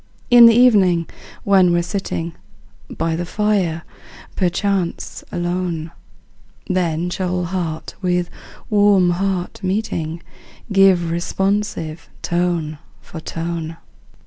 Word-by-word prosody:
In 240 -1 +10
the 230 - +6
evening, 195 -9 +4 0.4
when 190 -3 +4
we're 175 0 +2
sitting 170 -3 -3 0.6
By 165 -1 -2
the 175 - -2
fire, 185 -4 0 0.5
perchance 185 0 -1
alone, 175 -2 -2 0.7
Then 175 -2 -1
shall 180 -1 -1
heart 170 -3 -4
with 180 -1 0 0.4
warm 205 -4 +4
heart 185 0 -2
meeting, 175 -4 -2 0.5
Give 190 -4 +4
responsive 175 -2 -2
tone 170 -3 -1 0.2
for 165 - -10
tone. 165 0 -5
175 Hz, 95 wpm, -20 LUFS, 170-195 Hz, 0.7 s, In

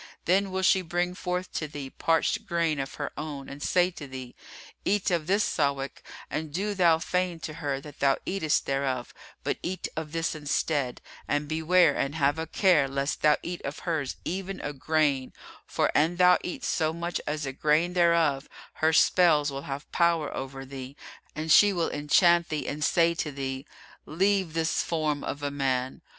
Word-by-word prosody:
Then 195 +3 +2
will 190 0 -2
she 190 0 +4
bring 175 +1 -1
forth 180 0 -4
to 155 - -2
thee 140 -2 -7
parched 185 +7 0
grain 170 -4 0
of 135 0 -4
her - - -4
own 145 -3 -6
and 140 +1 -9
say 180 +3 +2
to 150 -5 -9
thee, 130 -2 -8 0.5
'Eat 200 -1 +1
of 165 -3 0
this 200 +3 +3
Sawík; 140 -3 -1 0.3
and 150 +1 -4
do 200 +6 -1
thou 175 -4 +4
feign 180 0 -1
to 155 - -5
her 140 -2 -1
that 145 0 -12
thou 135 -1 +3
eatest 180 -5 0
thereof, 135 -2 -2 0.3
but - - -2
eat 185 +1 -3
of 155 -1 -5
this 165 0 -1
instead, 145 -3 -1 0.3
and 145 0 0
beware 160 0 +3
and 140 +2 -1
have 145 0 +1
a 160 - -3
care 165 -5 +3
lest 140 +1 -2
thou 150 -1 +5
eat 175 0 -5
of 140 +2 -5
hers 155 -6 -1
even 190 +2 -4
a 145 - -4
grain; 145 -2 0 0.3
for, - - +1
an 160 +4 +2
thou 180 0 +5
eat 180 - -6
so 155 0 0
much 170 +1 -3
as 150 0 -2
a 135 - -4
grain 155 +5 +2
thereof, 170 -5 +2 0.3
her 160 0 +4
spells 155 -4 +4
will 135 +1 -7
have 135 +1 -6
power 170 -3 +1
over 135 0 -6
thee 135 0 -8 0.4
and 155 +1 -2
she 205 +5 +7
will 170 -4 -1
enchant 170 +4 +3
thee 155 -1 -3
and 150 +1 -3
say 170 +1 +3
to 160 -2 -3
thee, 135 0 -5 0.4
'Leave 190 +1 +1
this 165 0 +1
form 155 -3 -1
of 145 - -5
a 145 - -1
man. 130 -2 -1
155 Hz, 185 wpm, -27 LUFS, 140-175 Hz, 0.5 s, she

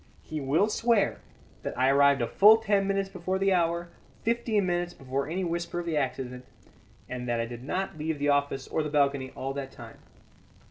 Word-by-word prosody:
He 155 -1 -5
will 145 +9 +2
swear 225 -1 +1 0.4
that - - -5
I 130 +1 +3
arrived 140 -1 +4
a - - 0
full 210 - +7
ten 200 -3 +1
minutes 195 0 0
before 185 -1 -3
the 195 0 +2
hour, 170 0 0 0.3
fifteen 230 -3 +1
minutes 175 0 -1
before 135 +2 -3
any 185 +3 -2
whisper 170 0 -3
of 175 - -4
the 165 -2 -1
accident, 125 -2 -2 0.6
and 125 -1 -5
that 120 -1 0
I 115 - 0
did 120 +1 -8
not 180 +2 -3
leave 155 0 -2
the 145 0 0
office 140 -1 +1
or - - -1
the 150 - -3
balcony 140 -3 +1
all 135 +1 -4
that 135 -1 -5
time. - - -12
155 Hz, 195 wpm, -28 LUFS, 135-190 Hz, 0.6 s, full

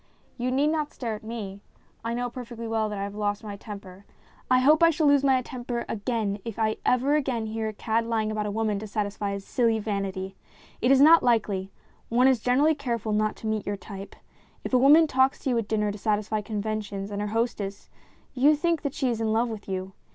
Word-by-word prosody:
You 250 0 -2
need 275 +4 +2
not 305 -1 -1
stare 235 -3 -4
at 210 - -7
me. 210 -3 -6 0.4
I 230 +1 -2
know 245 0 -1
perfectly 235 -2 -7
well 220 -1 0
that 210 - -4
I 195 - -2
have 200 0 -5
lost 205 0 -2
my 205 -2 -6
temper. 200 -2 -10 0.5
I 255 - +5
hope 300 +5 +5
I 335 - +7
shall 315 -1 +1
lose 285 -1 +5
my 265 -2 +3
temper 240 -1 -4
again 210 -2 -2
if 230 -3 -6 0.3
ever 260 +3 +2
again 260 -6 0
I 220 - -4
hear 220 0 -2
a 215 - -4
cad 225 +2 -1
lying 220 -2 0
about 210 -1 -2
a - - -2
woman 210 -1 -1
to 215 - -7
satisfy 205 -1 -2
his 200 0 -6
silly 230 -3 +1
vanity; 195 -3 -3 0.5
it 245 - +2
is 270 0 +6
not 325 +3 +8
likely; 210 -5 +1 0.4
one 245 +3 +4
is 260 -3 +4
generally 270 +7 +3
careful 235 -7 -2
not 215 0 +1
to - - -11
meet 215 -2 -2
your 205 0 -2
type. 195 0 -9 0.5
If - - -5
a 255 - +6
woman 295 +5 +7
talks 265 -2 +2
to 265 - 0
you 240 - +1
at 220 - -4
dinner, 210 -1 0
to 205 - -8
satisfy 215 0 0
conventions 210 -1 -4
and 205 0 -3
her 210 - -2
hostess, 210 -3 -3 0.4
you 280 +4 +4
think 335 +1 0
that 285 -2 -3
she 270 - 0
is 230 -2 -2
in 220 -1 0
love 230 +2 +1
with 215 -3 -7
you. 190 0 -4
225 Hz, 225 wpm, -26 LUFS, 205-255 Hz, 0.5 s, not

